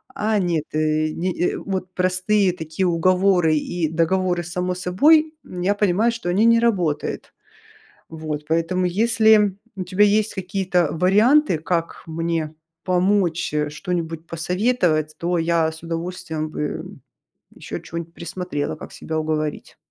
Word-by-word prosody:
А 215 -3 0
нет, 170 -4 0
э. 155 0 +1
Ни, 175 +3 -3 0.2
э, - - -4
вот 185 -2 -4
простые 185 +1 +1
такие 160 +2 -2
уговоры 180 -1 +3
и 160 +1 -1
договоры 175 +2 +1
сами 180 +2 -2
с 180 - -8
собой, 310 - +4
я 180 +3 -1
понимаю, 210 +3 +2
что 230 -6 -5
они 200 +6 +3
не 230 0 +5
работают. 185 -10 -1 0.8
Вот, 155 -2 -5
поэтому, 165 +3 0
если 215 0 +3 0.2
у 185 - -4
тебя 185 +3 +3
есть 210 +1 +2
какие-то 185 -3 0
варианты, 210 - +4
как 165 +1 -2
мне 165 -1 -2 0.3
помочь, 180 -3 +1
э, 150 -1 0
что-нибудь 165 0 -4
посоветовать, 170 -3 0
то 175 0 0
я 165 -1 +1
с 160 - -12
удовольствием 165 -2 -4
бы, - - -6
э, - - -3 0.7
ещё - - -6
чё-нибудь 170 0 -7
присмотрела, 170 -4 -4
как - - -10
себя 160 0 -4
уговорить. 155 -1 -3
180 Hz, 140 wpm, -22 LUFS, 160-190 Hz, 0.8 s, не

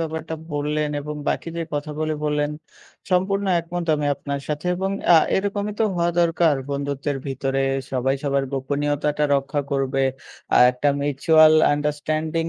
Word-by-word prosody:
ব্যাপারটা 160 0 -4 0.2
বললেন 150 +1 -1
এবং 150 +1 -6
বাকি - - -2
যে 165 - -1
কথাগুলি 150 +1 -2
বললেন 150 0 0 0.6
সম্পূর্ণ 195 +2 +1 0.2
একমত 170 +1 -5
আমি 145 -1 -1
আপনার 140 0 -5
সাথে। 150 +3 -3
এবং 190 +1 -1 0.2
অ্যা 175 - +8 0.2
এরকমই 205 +1 -2
তো 225 - +5
হওয়া 170 0 +1
দরকার। 165 -2 +3 0.2
বন্ধুত্বের 140 0 -2
ভিতরে 135 0 -1 0.3
সবাই 135 +1 0
সবার 140 -1 0
গোপনীয়তাটা 145 +2 -1
রক্ষা 140 +1 -2
করবে। 135 0 0 0.5
আ - - +6
একটা 125 +3 0
mutual 155 +2 +5 0.2
understanding 155 +2 -2
150 Hz, 140 wpm, -22 LUFS, 140-165 Hz, 0.6 s, অ্যা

